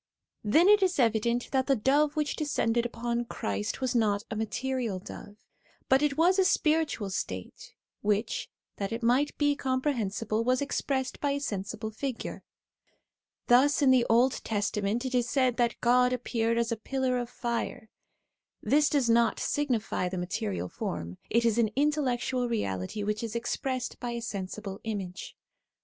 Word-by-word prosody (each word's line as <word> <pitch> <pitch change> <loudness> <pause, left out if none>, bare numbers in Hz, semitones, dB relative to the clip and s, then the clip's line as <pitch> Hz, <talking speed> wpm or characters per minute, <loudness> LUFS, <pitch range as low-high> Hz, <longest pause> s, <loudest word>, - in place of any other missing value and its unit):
Then 310 - +4
it 415 0 +6
is 375 -1 +2
evident 235 0 +1
that 265 -1 +1
the 275 - +4
dove 285 +6 +2
which 300 -2 -1
descended 240 -6 0
upon 235 0 -2
Christ 105 - -3
was 260 -1 0
not 210 -4 +2
a - - -2
material 235 0 -2
dove, 205 +2 -10 0.5
but 265 +1 +5
it 295 -2 +1
was 360 +4 +4
a - - +6
spiritual 310 - +1
state, 95 - -5 0.3
which, 210 +2 -1 0.3
that 200 +1 -3
it 230 +1 -4
might 255 +5 +2
be 290 -1 +2
comprehensible, 230 -6 -1
was 255 +1 +2
expressed 270 -2 -2
by 285 -1 0
a 285 - -1
sensible 215 -3 -4
figure. 255 +2 -5 1.0
Thus 285 +5 +4
in 265 - +6
the 250 -2 +4
Old 245 +3 +3
Testament 210 +2 -1
it 260 - -3
is 245 -1 +1
said 255 -3 +2
that 240 -1 +1
God 250 +1 +4
appeared 230 -2 0
as 235 0 0
a 230 - -1
pillar 255 +2 -1
of 240 -1 -4
fire; 235 -2 -4 0.7
this 295 +1 +3
does 280 -5 +2
not 230 0 +3
signify 235 -10 -1
the 185 - -4
material 100 - -3
form, 85 0 -5
it 235 +1 +2
is 230 0 +2
an 230 - +4
in 290 +3 +3
tellectual 255 -3 -1
reality 100 - -2
which 210 +1 -1
is 230 -1 -5
expressed 255 +2 -3
by 240 -1 -3
a 235 - -4
sensible 200 -2 -5
image. 200 -4 -5
240 Hz, 165 wpm, -29 LUFS, 215-265 Hz, 1.0 s, it